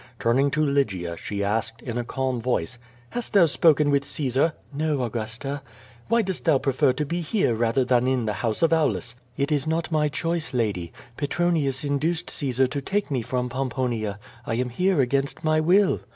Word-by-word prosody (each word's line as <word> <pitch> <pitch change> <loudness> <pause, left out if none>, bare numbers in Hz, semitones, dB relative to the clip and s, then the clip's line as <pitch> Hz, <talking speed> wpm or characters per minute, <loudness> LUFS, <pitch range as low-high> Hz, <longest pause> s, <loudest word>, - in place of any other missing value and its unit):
Turning 130 +5 +2
to 150 +2 +1
Lygia, 100 - 0
she 100 +4 -4
asked, 110 +3 -2
in 120 -3 -4
a 120 - -1
calm 130 0 -2
voice: 120 -1 -1 0.3
"Hast 240 -1 -4
thou 195 -4 +7
spoken 150 -1 +4
with 140 0 +2
Caesar?" 140 +3 +1 0.2
"No, 150 -2 0
Augusta." 120 +5 -4 0.5
"AVhy 230 -2 +3
dost 190 -1 -3
thou 160 -4 +5
prefer 130 -1 +2
to 145 +4 -2
be 170 +4 -2
here 170 - +1
rather 115 +3 +1
than 125 0 +2
in 130 -3 +1
the 105 - -1
house 115 +5 -1
of 165 0 +4
Aulus?" 150 -6 +1 0.2
"It 140 +2 0
is 145 0 0
not 165 +1 -1
my 150 -1 +2
choice, 165 -1 -2
lady. 100 -8 -1 0.3
Petronius 150 -3 0
induced 155 +4 -1
Caesar 130 -3 +1
to 140 +2 -3
take 200 +3 -2
me 130 -3 0
from 125 +2 -2
Pomponia. 120 -5 -2 0.3
I 115 - -2
am 125 +1 -1
here 180 +5 +2
against 135 +4 -1
my 155 0 +3
will." 185 +5 +4
135 Hz, 185 wpm, -25 LUFS, 120-155 Hz, 0.5 s, thou